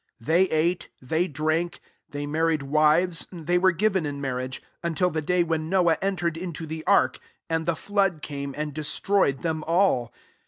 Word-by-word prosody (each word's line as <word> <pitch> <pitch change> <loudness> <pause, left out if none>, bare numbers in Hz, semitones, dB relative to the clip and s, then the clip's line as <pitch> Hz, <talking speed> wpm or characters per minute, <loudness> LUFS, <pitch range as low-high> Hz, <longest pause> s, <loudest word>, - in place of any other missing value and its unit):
27 115 +8 -3
They 185 +2 +4
ate, 170 +3 0
they 160 +7 0
drank, 155 +3 -1 0.3
they 145 0 -4
mar^ 160 +3 +1
ricd 140 -1 -9
wivcsi 160 +2 +2
they 175 +2 +3
were 190 +1 +5
given 190 0 +1
in 140 -1 -5
marriage; 130 -1 -3 0.2
until 170 +2 +1
the 155 - -1
day 180 +3 +2
when 160 -1 -2
Noah 175 -4 +3
entered 175 -4 -1
into 170 -2 -5
the 160 0 -6
ark; - - +3 0.3
and 160 0 0
the 170 - +2
flood 195 -4 0
came, 140 -1 -5
and 150 -1 -3
destroyed 155 0 0
them 160 -2 -1
all. 165 -9 +2
160 Hz, 180 wpm, -25 LUFS, 150-180 Hz, 0.3 s, were